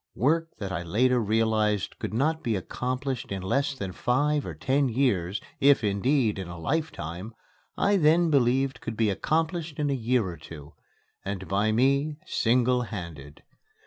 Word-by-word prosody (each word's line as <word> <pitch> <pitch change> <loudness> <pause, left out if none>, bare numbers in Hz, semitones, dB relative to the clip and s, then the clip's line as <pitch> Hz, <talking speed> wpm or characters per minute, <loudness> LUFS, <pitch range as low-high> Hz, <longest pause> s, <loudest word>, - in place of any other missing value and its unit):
Work 165 +6 +1
that 100 -2 -5
I 85 - -2
later 120 +9 +2
realized 110 -2 +1
could - - -4
not 155 +8 0
be 115 -2 0
accomplished 130 +6 -3
in 95 -1 -3
less 140 +8 0
than 100 -7 -5
five 145 +8 0
or - - -6
ten 135 0 +1
years, 105 -7 0 0.2
if, 140 -3 +5
indeed, 105 +2 +1
in 95 - -5
a 85 0 -8
lifetime, 105 - -3 0.4
I 200 0 +3
then 165 0 +4
believed 135 0 +2
could 115 -1 -5
be 110 -2 +2
accomplished 160 - -1
in 145 -2 0
a - - +2
year 125 -2 +1
or 85 -2 -6
two, 75 -1 -11 0.5
and 95 -1 -5
by 105 +3 +1
me 140 +6 +2
single 125 +1 +2
handed. 85 - -8
120 Hz, 160 wpm, -27 LUFS, 100-140 Hz, 0.5 s, if